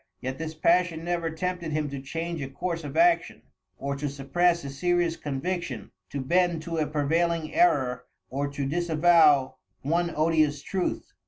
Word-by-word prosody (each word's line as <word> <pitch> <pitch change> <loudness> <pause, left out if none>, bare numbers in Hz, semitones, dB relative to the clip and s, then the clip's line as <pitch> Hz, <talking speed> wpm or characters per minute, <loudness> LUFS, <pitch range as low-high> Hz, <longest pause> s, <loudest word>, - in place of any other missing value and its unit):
Yet 130 +2 -5
this 160 -1 -5
passion 170 0 +2
never 170 -2 -1
tempted 170 0 -3
him 155 -1 0
to 140 -1 -5
change 165 +3 -4
a 135 - -3
course 165 +4 -4
of 145 - -6
action 345 0 +3 0.3
or 140 0 -3
to 145 +1 -2
suppress 170 +5 +1
a 140 - -5
serious 175 +3 +1
conviction, 145 - -4 0.2
to 140 - -4
bend 170 +3 +1
to 165 0 -4
a 155 - +1
prevailing 160 +2 0
error 130 - +2 0.2
or 140 +2 -2
to 140 0 -4
disavow 160 -3 +4 0.3
one 170 +4 +1
odious 155 -2 +2
truth." 190 -2 -3
160 Hz, 160 wpm, -27 LUFS, 140-175 Hz, 0.3 s, disavow